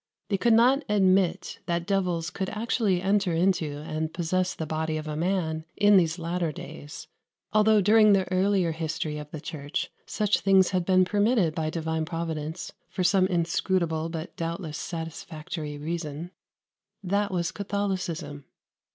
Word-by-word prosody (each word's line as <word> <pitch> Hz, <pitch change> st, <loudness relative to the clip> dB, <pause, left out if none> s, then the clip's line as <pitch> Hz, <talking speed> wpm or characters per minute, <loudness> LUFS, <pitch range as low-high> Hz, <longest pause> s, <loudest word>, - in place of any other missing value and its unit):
They 200 Hz, -, +1 dB
could 235 Hz, +2 st, +4 dB
not 255 Hz, +5 st, +5 dB
admit 190 Hz, -3 st, +2 dB
that 170 Hz, 0 st, -1 dB
devils 180 Hz, -4 st, 0 dB
could 190 Hz, -1 st, -3 dB
actually 215 Hz, -4 st, 0 dB
enter 195 Hz, -2 st, +2 dB
into 165 Hz, -4 st, +1 dB
and 155 Hz, 0 st, -3 dB
possess 185 Hz, +2 st, -1 dB
the 160 Hz, -, -4 dB
body 155 Hz, 0 st, -2 dB
of 155 Hz, 0 st, -5 dB
a 150 Hz, -, -3 dB
man 160 Hz, -2 st, -1 dB
in 205 Hz, 0 st, +6 dB
those 170 Hz, -2 st, +2 dB
latter 170 Hz, -1 st, -2 dB
days, 150 Hz, +1 st, -9 dB, 0.5 s
although 215 Hz, 0 st, +5 dB
during 215 Hz, +1 st, +6 dB
the 190 Hz, -1 st, +3 dB
earlier 185 Hz, -2 st, +2 dB
history 160 Hz, -1 st, -3 dB
of 150 Hz, 0 st, -8 dB
the 155 Hz, -, -7 dB
Church 145 Hz, -2 st, -4 dB, 0.2 s
such 210 Hz, -1 st, +1 dB
things 190 Hz, -2 st, +4 dB
had 180 Hz, -2 st, 0 dB
been 185 Hz, 0 st, +4 dB
permitted 205 Hz, -3 st, +2 dB
by 155 Hz, -1 st, -1 dB
Divine 160 Hz, -1 st, -2 dB
Providence 160 Hz, -1 st, -4 dB, 0.2 s
for 185 Hz, -, -2 dB
some 185 Hz, +1 st, +4 dB
inscrutable 170 Hz, -1 st, 0 dB
but 165 Hz, 0 st, -6 dB
doubtless 165 Hz, -2 st, -4 dB
satisfactory 160 Hz, -2 st, -6 dB
reason: 160 Hz, +1 st, -4 dB, 0.7 s
that 200 Hz, +2 st, 0 dB
was 175 Hz, -1 st, -1 dB
Catholicism. 185 Hz, -8 st, -3 dB
175 Hz, 150 wpm, -27 LUFS, 160-195 Hz, 0.7 s, in